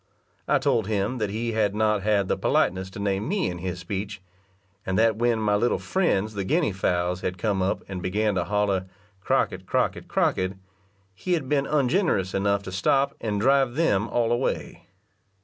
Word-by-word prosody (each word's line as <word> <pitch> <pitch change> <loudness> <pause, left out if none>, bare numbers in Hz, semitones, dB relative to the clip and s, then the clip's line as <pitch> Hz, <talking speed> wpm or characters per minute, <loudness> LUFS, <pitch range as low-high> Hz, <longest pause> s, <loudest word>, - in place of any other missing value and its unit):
I - - +4
told 110 -4 +1
him 110 +4 -1
that 105 -2 -1
he 115 +3 -2
had 105 -2 +1
not 105 -1 +2
had 100 -1 +1
the - - +1
politeness 95 +1 +1
to 95 - -9
name 100 +2 -1
me 185 - 0
in 90 - -7
his 90 0 -4
speech, 100 +3 -5 0.6
and 95 0 -1
that 110 0 +3
when 120 0 +2
my 105 -2 +1
little 120 +4 +2
friends, 110 - 0
the 100 -1 -3
guinea 155 - +1
fowls, 90 -1 -1
had 90 0 -3
come 100 0 0
up 95 +1 -1
and 95 -2 -5
began 105 +4 0
to 90 -2 -1
holler 100 -1 0 0.3
"Crockett, - - 0
Crockett, - - 0
Crockett," 95 +1 +1 0.6
he 180 - -2
had 155 -6 -1
been 140 -1 +1
ungenerous 145 - +1
enough 100 0 +1
to 95 - -7
stop, 135 +9 +2
and 105 -3 -1
drive 135 +1 +3
them 115 -10 +2
all 115 -1 0
away. 120 +2 -2
105 Hz, 185 wpm, -25 LUFS, 95-120 Hz, 0.6 s, I